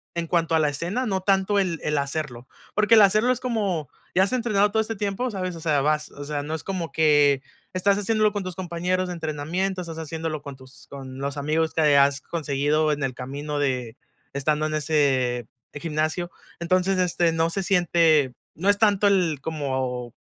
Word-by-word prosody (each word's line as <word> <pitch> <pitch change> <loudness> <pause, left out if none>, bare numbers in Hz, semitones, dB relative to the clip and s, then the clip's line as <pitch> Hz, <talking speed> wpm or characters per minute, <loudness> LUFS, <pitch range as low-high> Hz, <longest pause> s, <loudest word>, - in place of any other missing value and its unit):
en 170 -1 -2
cuanto 165 -1 +1
a - - +4
la 155 - +3
escena, 175 - -2
no 190 -4 -1
tanto 195 +1 +2
el 175 -4 -1
el 150 0 0
hacerlo, 140 -4 -4 0.3
porque 210 +2 +4
el 220 - +8
hacerlo 215 +5 +4
es 250 - -1
como, 200 - -1 0.3
ya 190 - +4
has 200 - 0
entrenado 210 -5 +2
todo 220 +1 +2
este 225 +1 -3
tiempo, 205 +5 -2
¿sabes?, 185 -3 -4
o 165 - -9
sea, 155 -3 +2
vas, 150 +1 0
o 145 - -9
sea, 145 0 -3
no 155 +2 -5
es 160 - -6
como 180 -4 -3
que 145 -3 +4 0.3
estás 195 +2 +2
haciéndolo 215 +1 +2
con 205 -2 -3
tus 185 -1 -6
compañeros 180 +1 -2
de 180 - -4
entrenamiento, 170 +4 -2
estás 165 -2 -7
haciéndolo 160 -1 -4
con 140 -1 -8
tus 130 -1 -16
con 135 -1 -9
los 140 +1 -3
amigos 155 +3 0
que 150 -3 +4
has 140 0 +4
conseguido 150 0 0
en 145 -1 -2
el 130 -1 -1
camino 145 +4 -5
de 125 -5 -1 0.4
estando 150 +2 0
en 155 - -2
ese 135 -6 +1 0.3
gimnasio, 155 +3 -2 0.3
entonces, 185 +2 +1
este, 175 -1 +2
no 165 0 +1
se 195 +3 -2
siente, 165 -7 +3 0.2
no 185 +5 -1
es 205 - +4
tanto 205 -2 +3
el 180 -7 +2
como 130 -6 -3
160 Hz, 195 wpm, -24 LUFS, 145-190 Hz, 0.4 s, el